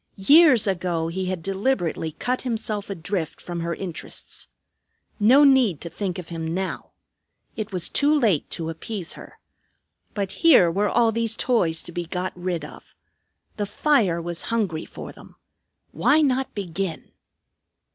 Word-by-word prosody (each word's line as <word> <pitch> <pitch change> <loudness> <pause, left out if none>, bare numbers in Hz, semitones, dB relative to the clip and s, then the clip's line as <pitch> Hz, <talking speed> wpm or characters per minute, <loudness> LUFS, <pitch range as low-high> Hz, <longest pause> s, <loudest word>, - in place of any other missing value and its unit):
Years 280 - +6
ago 175 -4 -1
he 185 +2 -3
had 185 -3 -3
deliberately 190 -5 -1
cut 250 +10 -2
himself 220 -4 -3
adrift 180 -3 -3
from 175 -1 -6
her 170 0 -2
interests. 180 -4 -5 0.7
No 250 +8 +6
need 260 - +4
to 170 - -6
think 195 -3 -3
of 180 -2 -8
him 165 -1 -4
now. 190 0 -4 0.7
It 215 -1 -5
was 180 -3 -1
too 290 +1 +2
late 210 - +1
to 165 -1 -3
appease 180 +2 -6
her. - - -13 0.8
But 200 -2 -2
here 245 - +6
were 200 +4 +1
all 230 -1 +3
these 230 0 0
toys 180 -11 +1
to - - -6
be 170 0 -4
got 180 +2 -3
rid 175 -3 -3
of. - - -14 0.6
The 205 -1 -2
fire 210 - +2
was 170 0 -2
hungry 200 -9 -1
for - - -9
them. - - -16 0.6
Why 305 +2 +3
not 265 -1 0
begin? 190 -3 -4
190 Hz, 150 wpm, -24 LUFS, 170-225 Hz, 0.8 s, Years